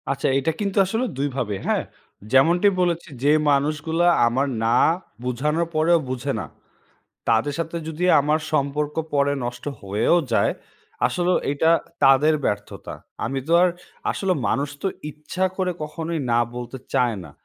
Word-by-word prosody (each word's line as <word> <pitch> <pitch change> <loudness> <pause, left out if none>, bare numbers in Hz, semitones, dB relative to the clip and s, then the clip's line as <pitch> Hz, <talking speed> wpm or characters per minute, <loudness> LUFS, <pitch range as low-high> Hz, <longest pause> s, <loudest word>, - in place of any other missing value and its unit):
আচ্ছা, 135 0 -1
এটা 140 +4 0
কিন্তু 200 -1 -2
আসলে 225 +6 -1
২ 140 +1 0
ভাবে 115 -6 -2
হ্যাঁ? - - +1 0.5
যেমনটি 170 +9 +5
বলেছি 175 0 -1
যে 145 - +5 0.2
মানুষগুলা 155 +4 +1 0.2
আমার 130 +4 +1 0.2
না 115 +1 +3 0.5
বোঝানোর 150 +7 0
পরেও 165 +2 +4
বুঝে 130 +2 -2
না। - - -4 0.8
তাদের 115 +6 +2
সাথে 165 0 -3
যদি 160 +2 -3 0.2
আমার 150 +2 +1
সম্পর্ক 150 0 0 0.2
পরে 140 0 +3
নষ্ট 120 0 -5 0.2
হয়েও 105 - +2 0.2
যায়, - - +3 0.5
আসলেও 180 0 +1
এটা 160 +3 +2 0.3
তাদের 135 +3 +5
ব্যর্থতা। 105 0 -3 0.3
আমি 135 - -2
তো - - +1
আর 180 - +5 0.4
আসলে 195 -1 0 0.2
মানুষ 140 +1 0
তো 195 - +1 0.2
ইচ্ছা 155 +5 -4
করে 185 -1 0
কখনোই 160 +2 -4
না 115 - +4 0.2
বলতে 125 +1 -6 0.2
চায় 120 -3 +2
না। 80 - -11
150 Hz, 150 wpm, -23 LUFS, 130-165 Hz, 0.8 s, যেমনটি